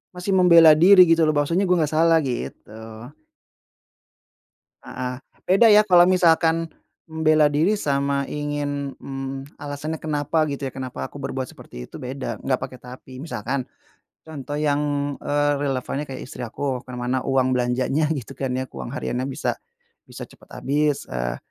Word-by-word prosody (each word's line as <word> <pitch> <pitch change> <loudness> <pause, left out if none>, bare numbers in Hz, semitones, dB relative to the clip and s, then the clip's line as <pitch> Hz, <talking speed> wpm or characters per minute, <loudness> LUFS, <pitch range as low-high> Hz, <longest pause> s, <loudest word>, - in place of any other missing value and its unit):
masih 180 +2 -3
membela 170 -3 +8
diri, 190 +1 +7
gitu 165 0 +4
loh. 155 - +3
Bahwasanya 165 +7 +1
gue 180 - +3
nggak 155 -2 0
salah 165 0 +4
gitu. 120 -3 -6 2.1
Heeh. 125 0 -5 0.3
Beda 195 +5 +5
ya, 210 0 +6
kalau 175 -3 +6
misalkan 165 -2 +3 0.4
membela 155 -1 +2
diri, 160 +9 +1
sama 140 -3 0
ingin, 145 -1 -4
mmm, 135 0 -6 0.2
alasannya 145 +2 -5
kenapa, 155 +1 -1
gitu 140 0 -4
ya, 130 - -5
kenapa 130 -1 -6
aku 145 - -10
berbuat 130 -1 -3
seperti - - -11
itu - - -11
beda, 130 +1 -5
enggak 130 -1 0
pakai 130 - -7
tapi. 130 +1 -11
Misalkan 130 -3 -4 0.6
contoh 145 -2 -7
yang, 145 -1 -1
eee, 145 0 +1
relevannya 140 0 -2
kayak 135 -3 -8
istri 125 -4 -7
aku, 130 +2 -4
ke 125 - -11
mana 125 +1 -2
uang 130 -1 +1
belanjanya, 130 +5 0
gitu 135 -8 -7
kan 135 -2 -3
ya, 130 0 -3
kuang 120 - -8
hariannya 130 -4 -3
bisa 135 - -2 0.5
bisa - - -10
cepet - - -20
habis, 145 +1 -1
eee, - - -3
145 Hz, 155 wpm, -22 LUFS, 130-160 Hz, 2.1 s, membela